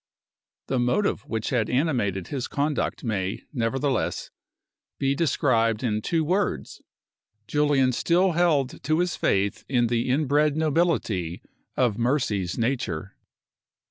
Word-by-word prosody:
The 130 Hz, -, -1 dB
motive 125 Hz, +13 st, +1 dB
which 110 Hz, +2 st, -3 dB
had 115 Hz, -4 st, +1 dB
animated 120 Hz, -, 0 dB
his 135 Hz, -4 st, -3 dB
conduct 145 Hz, 0 st, -1 dB
may, 100 Hz, -4 st, -2 dB
nevertheless, 130 Hz, +1 st, -1 dB, 0.7 s
be 135 Hz, 0 st, +1 dB
described 125 Hz, -7 st, +1 dB
in 110 Hz, -3 st, 0 dB
two 165 Hz, +7 st, 0 dB
words: 185 Hz, +6 st, -1 dB, 0.6 s
Julian 145 Hz, -1 st, +2 dB
still 180 Hz, +8 st, +2 dB
held 155 Hz, -6 st, +1 dB
to 155 Hz, +3 st, +1 dB
his 175 Hz, 0 st, 0 dB
faith 100 Hz, +1 st, 0 dB
in 120 Hz, -3 st, +2 dB
the 120 Hz, +1 st, 0 dB
inbred 145 Hz, +2 st, +2 dB
nobility 150 Hz, -, 0 dB, 0.3 s
of 120 Hz, -4 st, +1 dB
Mercy's 115 Hz, -8 st, 0 dB
nature. 115 Hz, -8 st, -2 dB
130 Hz, 115 wpm, -25 LUFS, 115-150 Hz, 0.7 s, Julian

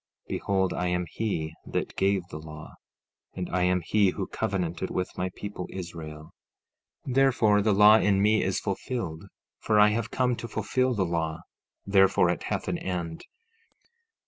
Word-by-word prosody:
15:5 -, -, -44 dB
Behold, 95 Hz, -2 st, 0 dB
I 90 Hz, -, -1 dB
am 90 Hz, 0 st, 0 dB
he 80 Hz, -8 st, -2 dB
that -, -, -3 dB
gave 95 Hz, -2 st, +1 dB
the 75 Hz, -, -7 dB
law, 75 Hz, 0 st, -10 dB, 0.6 s
and 90 Hz, -1 st, -3 dB
I 90 Hz, -, 0 dB
am 90 Hz, 0 st, +2 dB
he 105 Hz, +1 st, +3 dB
who -, -, -3 dB
covenanted 90 Hz, -2 st, -2 dB
with 90 Hz, -, -3 dB
my 95 Hz, -, -2 dB
people 100 Hz, -3 st, -6 dB
Israel; 80 Hz, -4 st, -8 dB, 0.7 s
therefore, 125 Hz, -6 st, +3 dB
the 105 Hz, +1 st, +2 dB
law 105 Hz, +2 st, +7 dB
in 100 Hz, -2 st, +2 dB
me 105 Hz, +2 st, +3 dB
is 95 Hz, -, 0 dB
fulfilled, 95 Hz, -4 st, -4 dB, 0.3 s
for 105 Hz, -1 st, +2 dB
I 105 Hz, 0 st, +7 dB
have 115 Hz, +2 st, -1 dB
come 125 Hz, 0 st, +1 dB
to 115 Hz, -, -6 dB
fulfil 125 Hz, +4 st, 0 dB
the 95 Hz, -3 st, +1 dB
law; 80 Hz, -1 st, -2 dB, 0.4 s
therefore 95 Hz, -3 st, +4 dB
it 90 Hz, -, -3 dB
hath -, -, -3 dB
an -, -, -1 dB
end. 85 Hz, -3 st, -4 dB
95 Hz, 165 wpm, -27 LUFS, 85-105 Hz, 0.7 s, law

